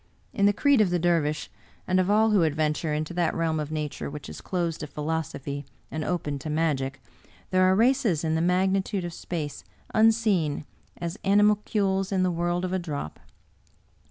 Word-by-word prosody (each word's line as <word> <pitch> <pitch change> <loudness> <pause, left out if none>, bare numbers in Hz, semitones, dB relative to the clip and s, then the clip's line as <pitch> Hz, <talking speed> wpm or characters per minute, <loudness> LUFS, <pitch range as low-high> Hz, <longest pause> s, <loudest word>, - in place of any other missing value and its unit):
In 200 - +3
the - - +5
creed 275 +3 +3
of 205 - +3
the 175 - +1
Dervish, 160 -3 +1 0.4
and 185 0 +3
of 185 +1 +1
all 215 +2 +4
who 205 -3 +4
adventure 155 0 0
into 155 +3 -2
that 175 -1 0
realm 160 -1 0
of 150 0 -4
Nature 150 -3 -3
which 150 0 -8
is - - -8
closed 170 -3 -2
to 150 - -5
philosophy 145 -2 -4 0.3
and 155 0 -3
open 150 -5 -2
to 155 - -6
magic, 145 -3 0 0.5
there 185 0 +4
are 185 0 +4
races 230 - +2
in 160 -1 0
the 160 - +1
magnitude 190 +2 +1
of 175 - -5
space 160 -4 -5 0.3
unseen 215 -10 +2 0.3
as 170 +2 -5
animalcules 200 -1 +2
in 190 -1 +2
the 185 - +2
world 175 +1 -1
of 185 - -3
a 190 - +1
drop. 145 - -5
175 Hz, 180 wpm, -26 LUFS, 155-195 Hz, 0.5 s, the